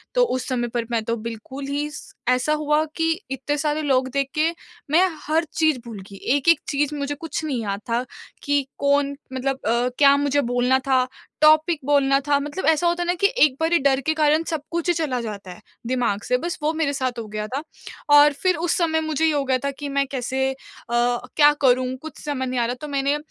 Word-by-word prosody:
तो - - +5
उस 255 - -2
समय 245 -2 -1
पर 235 0 -3
मैं 230 -2 0
तो 230 +1 -1
बिल्कुल 230 +5 -7
ही 290 +1 -2
स 300 - -10 0.2
ऐसा 250 +4 +2
हुआ 300 0 +1
कि 325 - -1 0.3
इतने 270 +2 -2
सारे 300 +1 -1
लोग 265 -3 +1
देख 275 -1 0
के 310 +2 +2 0.4
मैं 355 +4 +5 0.2
हर 320 +2 +2
चीज़ 315 -4 +2
भूल 225 -4 -8
गई, 200 - -11
एक-एक 285 +9 +2
चीज़ 290 +1 0
मुझे 285 0 -3
कुछ 320 +1 -5
नहीं 260 -6 -2
याद 200 -2 -3
था 235 +2 +1 0.4
कि 285 -1 +1
कौन 280 0 +2 0.2
मतलब 265 +1 -2
अ, 240 +2 +2
क्या 280 -1 +6
मुझे 285 0 +1
बोलना 245 +1 +2
था, 255 -1 +3 0.3
टॉपिक 310 +1 +5
बोलना 275 -1 +3
था 285 -1 +3
मतलब 295 +6 -4
ऐसा 320 +2 +3
होता 345 +1 +1
है - - -5
ना? 350 - +2
कि 395 +3 +2 0.2
एक 275 -4 +4
बारी 330 +1 +2
डर 270 -1 +2
के 315 +4 0
कारण 310 +1 +2
सब 320 -3 -2
कुछ 340 +1 -2
ही 350 - +4
चला 300 -7 -1
जाता 205 -4 -7
है, 195 +4 -12 0.3
दिमाग़ 240 -5 0
से 250 - +2
बस 340 +6 -4
वो 305 - +2
मेरे 310 -3 0
साथ 255 -3 -2
हो 225 - -5
गया 210 0 -4
था। 270 +5 -3 0.5
और 290 0 +7
फिर 365 +5 +1
उस 345 +1 0
समय 320 -2 +1
मुझे 315 0 0
ये 320 - +3
हो 285 -1 +1
गया 260 -1 +2
था 280 - 0
कि 285 +1 -7
मैं 275 0 +1
कैसे 265 +1 -1
अ, 265 - -7 0.4
क्या 245 +5 +3
करूँ 255 0 +3
कुछ 315 - -9
समझ 280 -3 -2
नहीं 255 -1 -1
आ 235 - +2
रहा, 245 - -1
तो 300 +4 -8
मैंने 280 +1 0
280 Hz, 225 wpm, -22 LUFS, 255-305 Hz, 0.5 s, और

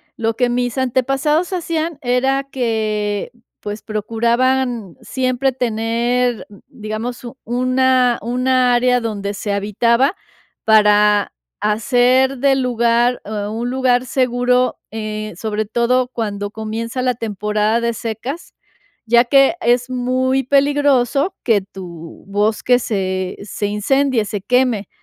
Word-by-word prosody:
lo 225 0 -1
que 245 - +2
mis 245 +1 -1
antepasados 270 +6 0
hacían 335 -3 -2
era 265 +2 +1
que, 215 -4 -2 0.3
pues, 210 +1 -6
procuraban 235 0 0
siempre 260 +1 -1
tener, 240 0 -1 0.2
digamos, 225 +4 -6 0.2
una 255 0 +2
una 250 +1 +1
área 250 0 +3
donde 205 -3 -3
se 205 +1 -4
habitaba 235 - +1 0.5
para 210 -1 +4 0.3
hacer 250 +4 +2
del 270 0 +2
lugar 240 0 +1
un 215 +3 -3
lugar 255 -1 +1
seguro, 250 0 +1
eh, 215 -1 -5
sobre 215 +2 -3
todo 240 +3 +1
cuando 205 -5 -4
comienza 225 +3 -4
la 250 -1 0
temporada 215 +1 -1
de 235 0 0
secas, 235 +8 -6 0.5
ya 235 +1 +5
que 275 +5 +4
es 245 -2 +2
muy 255 +1 0
peligroso 280 +2 +2
que 220 -5 +3
tu 175 -4 -11
bosque 215 +5 +1
se 190 -4 -2
se 205 0 -3
incendie, 240 +3 +1
se 205 -2 -4
queme. 245 -2 +1
240 Hz, 115 wpm, -18 LUFS, 215-255 Hz, 0.5 s, ya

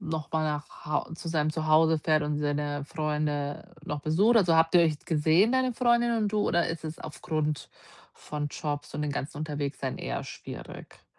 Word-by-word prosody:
noch 160 -5 -4
mal 160 0 +1
nach 150 -1 -4
Hau 150 +2 -1
zu 165 +1 -6
seinem 155 -2 +1
Zuhause 160 0 +4
fährt 155 0 +2
und 150 0 -1
seine 145 -1 -1
Freunde 150 +2 -2
noch 150 -1 -3
besucht? 190 +11 +3
Also 180 -6 +5
habt 165 +2 +4
ihr 175 - +8
euch 155 -3 +1
gesehen, 165 +7 +3
deine 260 -1 +2
Freundin 240 -1 +3
und 215 -2 +1
du 215 - +1
oder 175 0 +2
ist 165 -1 -5
es 155 0 -5
aufgrund 155 -1 -3 0.4
von 150 -1 -5
Jobs 145 0 -4
und 150 - -2
den 150 - -1
ganzen 140 +1 -4
Unterwegssein 145 -3 -3
eher 60 0 -3
schwierig? - - -10
155 Hz, 180 wpm, -28 LUFS, 150-165 Hz, 0.4 s, ihr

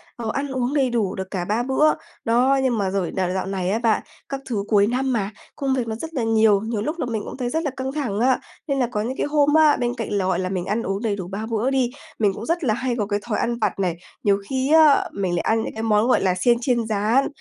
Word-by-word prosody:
ờ, 230 -2 -4
ăn 280 +1 -2
uống 260 0 -2
đầy 270 -4 +2
đủ 215 -5 -1
được 190 -1 -6
cả 180 -3 -2
3 220 +5 0
bữa. 270 +4 +3 0.3
Đó, 255 +4 +3
nhưng 250 -3 +1
mà 195 -2 0
rồi 190 -3 -1
nà 185 -1 -1
dạo 190 0 -2
này 190 -2 -2
á 220 +4 +1
bạn, 225 -3 +2 0.3
các 275 -1 -4
thứ 210 -5 -1
cuối 205 -1 +4
năm 260 +2 0
mà, 205 -4 0 0.3
công 275 -3 -1
việc 245 -3 -1
nó 220 - -3
rất 320 +7 -7
là 255 -6 -1
nhiều, 220 -3 +4
nhiều 220 -1 -2
lúc 310 +8 -3
là 300 - 0
mình 225 -3 -2
cũng - - -7
thấy 245 -2 -2
rất 320 +5 -1
là 290 - -1
căng 265 0 -3
thẳng 265 -9 -2
á. 255 +2 +3 0.3
Nên 275 -1 0
là 245 - +2
có 210 - -1
những 250 +4 -3
cái - - 0
hôm 290 0 +3
á, 310 -2 +5
bên 245 0 -1
cạnh 225 -2 -3
là, 200 -2 +1
gọi 185 -1 +1
là, 185 0 -2
mình 185 -2 -2
ăn 215 +3 -1
uống 195 +2 -2
đầy 215 -3 0
đủ 185 -3 -6
3 200 +4 -5
bữa 230 +2 0
đi, 265 -3 +1 0.3
mình 205 -3 +3
cũng 220 - -7
rất 335 +1 -1
là 225 -6 +2
hay 245 +1 -1
có 210 - -1
cái 205 0 0
thói 220 - -1
ăn 235 0 0
vặt 210 - -1
này, 175 -3 0 0.3
nhiều 200 -1 +3
khi 265 +3 +1
á, 310 -3 +6
mình 190 -3 -1
lại 170 - 0
ăn 225 0 +1
những - - -5
cái 220 - -5
món, 215 0 +3
gọi 255 - +3
là, 185 -1 +2
xiên 235 +4 +4
chiên 240 -2 +1
rán. 220 +5 +2
230 Hz, 295 wpm, -22 LUFS, 205-265 Hz, 0.3 s, á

